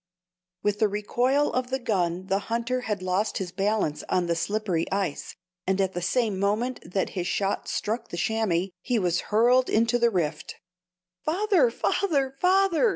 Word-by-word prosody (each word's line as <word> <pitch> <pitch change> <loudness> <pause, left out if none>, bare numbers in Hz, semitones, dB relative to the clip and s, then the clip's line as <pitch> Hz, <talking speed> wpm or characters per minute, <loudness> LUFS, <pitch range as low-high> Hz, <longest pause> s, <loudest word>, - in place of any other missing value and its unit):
With 205 0 0
the 215 - +4
recoil 245 +8 +1
of 250 0 -1
the 265 - 0
gun 185 -7 -1
the 195 +1 +1
hunter 235 +2 -1
had 210 -5 -3
lost 185 +4 0
his 185 -2 -4
balance 195 -6 0
on 180 -1 +2
the 170 0 0
slippery 175 -1 -1
ice, 195 -6 -2 0.3
and 190 +1 +1
at 190 -1 +1
the 175 - -3
same 210 +1 0
moment 220 +6 0
that 190 - 0
his 180 -2 -3
shot 200 0 -1
struck 230 +2 -2
the 170 - -7
chamois, 195 -3 0
he 245 +4 0
was 180 -4 +1
hurled 245 +4 +4
into 230 +2 +2
the 235 0 +4
"rift." 160 -7 -2 0.7
"Father! 410 +7 +3
father! 280 - 0
father!" 385 +3 +4
210 Hz, 165 wpm, -26 LUFS, 185-250 Hz, 0.7 s, the